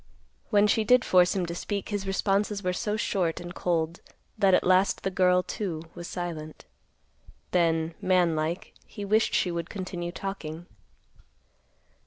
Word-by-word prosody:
When 205 -2 +4
she 215 +1 +2
did 250 +2 +4
force 180 0 +4
him 185 -2 0
to 170 - -5
speak, 200 +3 -4
his 205 -2 -3
responses 200 +1 0
were 180 0 0
so 210 +3 -2
short 180 -6 0
and 175 0 -7
cold 170 -1 -1 0.4
that 190 -2 +4
at - - +2
last 185 +2 +3
the 195 - -1
girl, 180 -1 +3
too, 175 -4 -4
was 175 0 -8
silent. 165 -4 -6 0.9
Then, 165 -2 +2
man 180 -3 +3
like, 155 +3 -3
he 205 - -7
wished 215 +2 +2
she 180 - +2
would 170 -1 -4
continue 180 -3 -5
talking. 175 -4 -6
180 Hz, 155 wpm, -27 LUFS, 170-200 Hz, 0.9 s, When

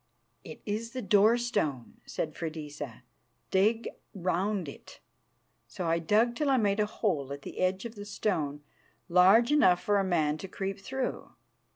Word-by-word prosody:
"It 155 - -10
is 225 +2 -3
the 255 - -3
door 210 +4 +5
stone," 200 - -2
said 155 - -3
Freydisa. 150 -7 -6 0.5
"Dig 215 +5 +2 0.3
round 185 0 -1
it." 140 - -11 0.7
So 170 +10 -5
I 165 0 +2
dug 215 +8 +3
till 295 +2 0
I 265 - +4
made 205 -3 +1
a 210 - +2
hole 160 - -1
at 140 0 -6
the - - -8
edge 185 +3 0
of 230 - -6
the 205 -2 -8
stone 155 -9 -2 0.5
large 190 +8 +6
enough 185 -12 +4
for 205 +1 +2
a - - +2
man 155 -5 +1
to 195 - -6
creep 195 +1 -4
through. 260 +5 -4
195 Hz, 165 wpm, -29 LUFS, 160-215 Hz, 0.7 s, large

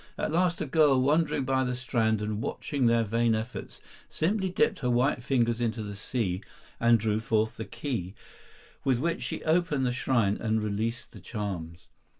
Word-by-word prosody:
At - - -1
last 175 +1 +2
a - - 0
girl, 145 -2 +4
wandering 145 +1 +2
by 130 0 +2
the 125 -1 -1
strand 110 -4 0
and 105 0 -2
watching 135 0 -1
their 115 0 +4
vain 115 +1 +2
efforts, 110 +3 -6 0.3
simply 190 +4 0
dipped 220 +2 +1
her 125 -4 -1
white 125 +1 +2
fingers 120 -3 +1
into 115 -1 -1
the 105 -1 -6
sea 100 -3 -2 0.4
and 115 0 +5
drew 105 0 0
forth 110 0 0
the 110 - -5
key, 105 -4 -4 0.7
with 130 -3 +2
which 165 +6 -1
she - - -4
opened 160 -4 +2
the 125 - +1
shrine 120 -4 +1
and 110 -1 0
released 110 +3 -2
the 105 - -12
charms. 90 -5 -5
120 Hz, 175 wpm, -28 LUFS, 110-140 Hz, 0.7 s, and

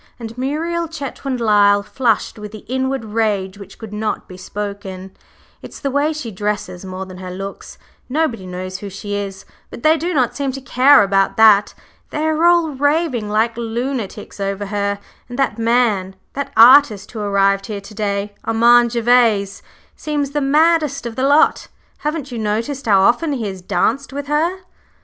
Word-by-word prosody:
and 230 -1 -7
Muriel 325 +6 -2
Chetwynd 275 -4 -5
Lyle 205 -2 +4
flushed 225 0 -1
with 210 -1 -8
the 215 -1 -11
inward 260 -1 -2
rage 210 -3 -1
which 200 -1 -12
could 220 -2 -9
not 215 0 -3
be 185 - -11
spoken. 190 -1 -7 0.5
"It's - - -10
the 275 - -2
way 285 +3 +1
she 300 -7 -6
dresses 200 -2 -4
more 190 0 -6
than 185 -1 -11
her 185 -1 -7
looks. 195 +2 -8 0.3
Nobody 250 -9 -1
knows 185 +1 -6
who 205 - -7
she 205 +2 -6
is 200 -1 -5 0.2
but - - -10
they 315 +1 +5
do 340 +4 -2
not 260 -7 +1
seem 280 -2 -2
to 270 - -5
care 255 -1 +5
about 195 0 +1
that. 210 -2 +5 0.3
They 305 +1 -2
are 315 +1 +1
all 345 -2 +4
raving 285 -5 0
like 220 +2 +1
lunatics 235 -2 -4
over 200 +1 -2
her, 200 0 -2 0.3
and 245 - -7
that 265 -5 0
man 225 -5 +1 0.2
that 280 0 -4
artist 230 -4 +6
who 225 - -7
arrived 195 -1 +1
here 205 -2 -5
to 195 +2 -13
day, 205 -1 -2
Armand 235 +1 +4
Gervase, 230 -4 +2 0.3
seems 290 -2 -3
the 295 0 -1
maddest 300 -1 +2
of 235 -1 -5
the 260 +2 +1
lot. 290 +2 +3 0.3
Haven't 300 -3 -3
you 235 - -4
noticed 230 +6 -2
how 195 -3 +5
often 265 +10 +2
he 240 -5 -3
has 190 -2 -5
danced 220 +10 -1
with 285 +1 -5
her?" 325 +6 0
225 Hz, 175 wpm, -18 LUFS, 200-275 Hz, 0.5 s, artist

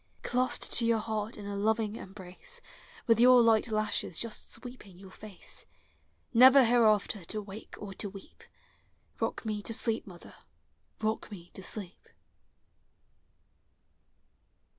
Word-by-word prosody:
Clasped 255 +1 0
to 240 - +2
your 230 -1 +3
heart 215 0 -3
in 205 - -8
a 200 0 -4
loving 215 +1 0
embrace, 190 - -8 0.5
With 230 -2 +4
your 250 +1 +8
light 225 0 +4
lashes 215 -5 -1
jusi 230 -2 -2
sweeping 245 -7 -10
your 190 0 -13
fate, 205 -1 -8 0.7
Never 260 +2 +8
hereafter 220 -4 +3
to 215 - -2
wake 205 +1 -10
or 200 -2 -8
to 200 - -4
weep; 195 0 -13 0.4
— - - -40
Kock - - -2
me 210 -1 -2
to 225 +2 0
sleep, 225 -2 +1
mother, 175 -3 -12 0.4
— - - -34
rock 220 +1 -1
me 175 -5 -11
to - - -9
sleep! 190 -1 -4
215 Hz, 140 wpm, -30 LUFS, 200-230 Hz, 0.7 s, your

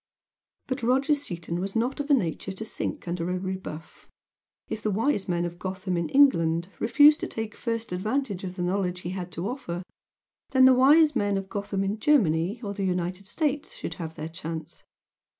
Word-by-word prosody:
But 260 0 -3
Roger 265 +5 +3
Seaton 175 - -3
was 195 +2 -4
not 245 +6 0
of 285 +1 -3
a 285 - +7
nature 190 -4 -2
to 215 +3 -6
sink 215 - -4
under 170 0 -2
a 180 - 0
rebuff. 185 -4 -7 0.6
If 215 - -4
the 215 - 0
Wise 210 0 0
Men 175 -1 +1
of 175 0 -6
Gotham 185 0 -3
in 170 -1 -1
England 170 -12 +4
refused 295 +6 +6
to - - -3
take 220 -1 -5
first 230 -3 -3
advantage 210 +2 -2
of 185 -1 -5
the 180 - -3
knowledge 180 -1 -1
he 175 - -4
had 180 -1 -5
to 170 +4 -3
offer 250 -8 -4
them, 175 +2 -4 0.7
then 260 -1 +7
the 260 - +8
Wise 295 +5 +6
Men 205 -1 +1
of 195 0 -5
Gotham 200 -2 -2
in 200 +2 -2
Germany 200 - +2
or 200 -1 -3
the 200 -1 -3
United 180 +1 -2
States 295 - -1
should 165 - -5
have 160 -1 -6
their 155 -1 -5
chance. 165 0 -7
195 Hz, 195 wpm, -27 LUFS, 175-250 Hz, 0.7 s, the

